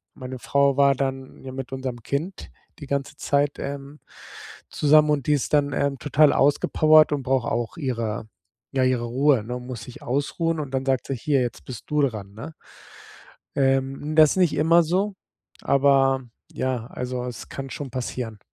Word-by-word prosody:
meine 130 -1 -7
Frau 140 +1 +2
war 140 -1 +5
dann 135 0 -4
ja 130 - -7
mit 130 0 -6
unserem 130 -3 -5
Kind 160 - -4 0.3
die 145 - -9
ganze 140 +1 -3
Zeit, 145 0 0
ähm, 140 +1 -6 0.7
zusammen 150 +1 +4
und 140 -3 -1
die 150 - +4
ist 145 -1 -1
dann, 145 -1 +3
ähm, 140 -1 -1
total 150 0 +4
ausgepowert 155 +2 +4
und 145 - -1
braucht 130 -2 0
auch 120 +8 -2
ihre 115 -7 -3 0.5
ja, 130 -1 +2
ihre 130 -2 +1
Ruhe, 130 0 +2
ne 125 +2 -5
muss 125 -2 -7
sich 125 - -11
ausruhen 155 +5 -1
und 140 -3 -7
dann 135 0 -1
sagt 130 -2 0
sie: - - -2
„Hier, 140 +1 +1
jetzt 120 -1 -4
bist 125 -4 -8
du 150 0 +2
dran“, 105 -7 -3
ne? 115 +10 -9 1.0
Ähm, 135 +2 0
das 155 +1 +6
nicht 180 -4 +3
immer 165 +3 +4
so 190 +5 0 0.5
aber 135 -1 +3 0.3
ja, 125 -3 -2
also 125 0 -5
es 125 -2 -7
kann 135 0 -6
schon 135 +1 -6
passieren. 120 -3 -5
135 Hz, 170 wpm, -24 LUFS, 125-145 Hz, 1.0 s, das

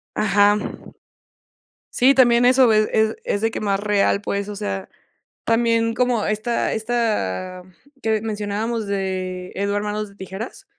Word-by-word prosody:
Ajá. 205 0 +3 1.3
Sí, 265 +2 +4
también 245 -2 +5
eso 255 -2 +5
es 215 0 +3
es 220 0 +2
es 205 - -1
de 225 0 +1
que - - -5
más 200 -2 0
real, 205 -1 +1
pues, 200 0 -3
o 205 - -6
sea, 95 - -4 0.6
también 230 0 +2
como 245 -3 +1
esta 215 +3 -1
esta, 210 - -2
mm 185 - -20 0.3
que 220 -1 +1
mencionábamos 215 +1 -3
de 185 -2 -3
Edward 200 +1 -1
Manos 210 0 -3
de 200 - -19
Tijeras 200 - -8
210 Hz, 145 wpm, -21 LUFS, 200-230 Hz, 1.3 s, también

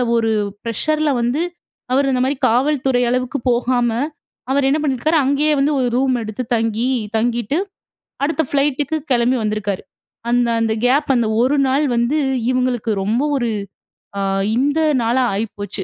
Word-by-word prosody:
ஒரு 225 -1 +1 0.3
ப்ரெஷர்ல 305 +7 0
வந்து, 245 +6 0 0.5
அவரு 275 0 +2
அந்த 250 - +1
மாரி 275 +1 -1
காவல்துறை 260 0 +1
அளவுக்கு 255 +3 -1
போகாம, 245 0 +1 0.6
அவர் 275 0 +2
என்ன 300 +3 +2
பண்ணிருக்காரு, 300 +4 +1
அங்கயே 290 +3 +2
வந்து 290 +2 +2
ஒரு 250 - +1
ரூம் 260 -1 +2
எடுத்து 220 +3 -5
தங்கி 225 +2 0 0.3
தங்கிட்டு, 240 +4 0 0.7
அடுத்த 320 +2 0
ஃப்ளைட்டுக்கு 285 +1 0 0.2
கெளம்பி 245 +1 +2
வந்திருக்காரு. 210 -2 -2 0.5
அந்த 240 0 +2
அந்த 225 -1 +1
கேப் 280 +2 +2
அந்த 235 -2 +1 0.2
1 275 +4 +2
நாள் 285 +3 +2
வந்து, 240 +6 +1 0.3
இவுங்களுக்கு 250 -3 0
ரொம்ப 230 +6 0
ஒரு 240 -3 0 0.7
அ - - -1 0.4
இந்த 285 +4 +1 0.2
நாளா 245 +3 +2
ஆயிப்போச்சு. 205 -2 -4
255 Hz, 140 wpm, -19 LUFS, 235-280 Hz, 0.7 s, அவரு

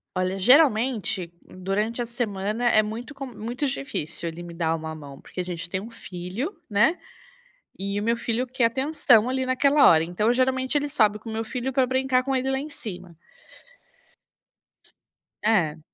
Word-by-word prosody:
Olha, 185 +1 0
geralmente, 230 - +3
durante 205 +6 -2
a - - -1
semana 225 -1 -2
é 215 - +5
muito 230 +7 -6
com 275 -1 -6
muito 240 +4 -4
difícil 155 - -3
ele 165 +1 -6
me 170 -1 -9
dar 165 -1 0
uma 160 0 -5
mão, 140 -3 -11
porque - - -9
a - - 0
gente 175 -1 -6
tem 185 - -2
um 225 +4 -9
filho, 205 - -5
né. 235 - +3 0.8
E 200 +1 -2
o 205 - -3
meu 230 +1 +1
filho 240 +2 -1
quer 250 -1 +1
atenção 255 -2 +3
ali 260 0 -1
naquela 280 +3 +5
hora. 160 -1 +6
Então, 210 +7 +1
geralmente, 260 +2 +1
ele 290 0 +1
sobe 215 -7 +2
com 225 - -9
o - - -5
meu 225 +1 -2
filho 250 +3 -3
para 260 0 +3
brincar 260 0 +1
com 270 0 -1
ele 260 +1 0
lá 265 - +1
em 295 +3 -5
cima. 185 - -8 2.3
É. 175 -8 +2
225 Hz, 175 wpm, -25 LUFS, 185-260 Hz, 2.3 s, hora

